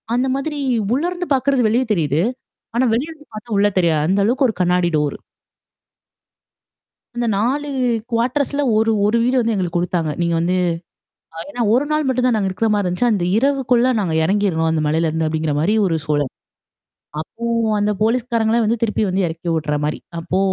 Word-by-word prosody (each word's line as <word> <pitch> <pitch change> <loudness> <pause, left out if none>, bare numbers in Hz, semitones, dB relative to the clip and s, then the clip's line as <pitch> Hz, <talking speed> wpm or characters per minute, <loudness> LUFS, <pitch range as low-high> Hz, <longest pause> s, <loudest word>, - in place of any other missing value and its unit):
அந்த 250 +2 +1
மாதிரி 295 +2 -3 0.4
உள்ள 275 +5 0
இருந்து 360 0 -4
பாக்குறது 270 -2 +2
வெளிய 235 +4 +2
தெரியுது. 155 -6 +1 0.5
ஆனா, 250 +2 +3
வெளிய 260 +8 -1
இருந்து 300 -2 -15
பார்த்தா 215 +1 -5
உள்ள 205 +1 +4
தெரியா 170 -3 +3
அந்த 195 +3 +2
அளவுக்கு 260 +4 +2
ஒரு 220 - -3
கண்ணாடி 180 0 +2
டோரு. 150 -1 -1 2.0
அந்த 240 0 -1
4 275 +7 0 0.4
குவார்டர்ஸ்ல 260 +5 0
ஒரு, 220 +1 +3
ஒரு 215 +3 +2
வீடு 250 +2 +2
வந்து 230 -1 +1
எங்களுக்கு 180 -3 -1
குடுத்தாங்க. 175 -3 -1
நீங்க 170 0 +1
வந்து. 175 +2 0 0.8
அ - - -7
ஏன்னா 245 -4 -4
ஒரு 260 +5 +2
நாள் 305 0 +1
மட்டும் 255 -1 +1
தான் 245 - +2
நாங்க 195 -2 0
இருக்கிறமாரி 210 +1 0
இருந்துச்சு. 180 +7 +1
அந்த 195 -5 0
இரவுக்குள்ள 255 -1 +2
நாங்க 180 -6 -1
இறங்கிர்றோம் 185 -3 +1
அந்த 160 -1 0
மலையில 160 +2 +1
இருந்து 160 0 -1
அப்பிடிங்கிறமாரி 155 +4 0
ஒரு 165 -4 +1
சூழல். 145 -3 0 0.9
அப்போ 230 +8 -8 0.3
அந்த 205 +1 +1
போலீஸ்காரங்களே 230 -1 +1
வந்து 230 +2 0
திருப்பி 220 -1 0
வந்து 185 0 +1
இறக்கி 165 +1 -5
விட்றமாரி. 150 -1 -1 0.2
அப்போ 175 +3 -2
210 Hz, 165 wpm, -19 LUFS, 170-245 Hz, 2.0 s, உள்ள